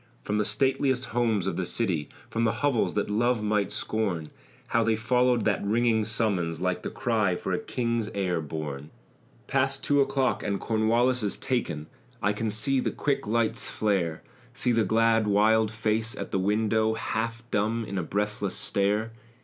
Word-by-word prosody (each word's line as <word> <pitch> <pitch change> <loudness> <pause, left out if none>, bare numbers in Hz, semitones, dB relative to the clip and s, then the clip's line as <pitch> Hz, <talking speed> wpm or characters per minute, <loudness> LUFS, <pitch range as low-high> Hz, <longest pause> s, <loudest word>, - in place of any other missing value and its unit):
From 105 +1 -1
the 105 - +1
stateliest 135 0 +1
homes 115 -6 +1
of 95 - -2
the 95 - 0
city, 85 -7 -1 0.2
From 115 0 0
hovels 130 +1 0
that 105 - 0
love 115 +2 +1
might 105 -1 +1
scorn, 95 -8 -2 0.4
How 115 - +2
they 110 0 +2
followed 125 +1 +2
that 105 -3 +1
ringing 110 +1 +2
summons, 100 -7 0
Like 90 0 -1
the - - -4
cry 110 -6 0
for 95 - -3
a 90 - 0
king's 115 -3 -2
heir 90 -4 0
born! 75 -2 -5 0.6
"Past 135 0 0
two 145 -1 +3
o'clock 135 -1 +1
and 100 -2 -2
Cornwallis 115 +3 +2
is 105 -2 -1
taken." 85 - -2 0.3
I 100 +1 +1
can 110 +2 -2
see 110 +6 +2
the - - 0
quick 140 -6 -1
lights 115 +1 +1
flare, 95 -7 -1 0.3
See 125 - 0
the 115 -1 +3
glad, 115 0 +3
wild 110 +2 +4
face 110 +2 -1
at - - -5
the 95 - +1
window, 110 +2 +1
Half 115 +1 -3
dumb 110 +3 0
in 100 -2 -3
a - - 0
breathless 105 +2 -2
stare. 105 +3 0
110 Hz, 170 wpm, -27 LUFS, 100-115 Hz, 0.6 s, wild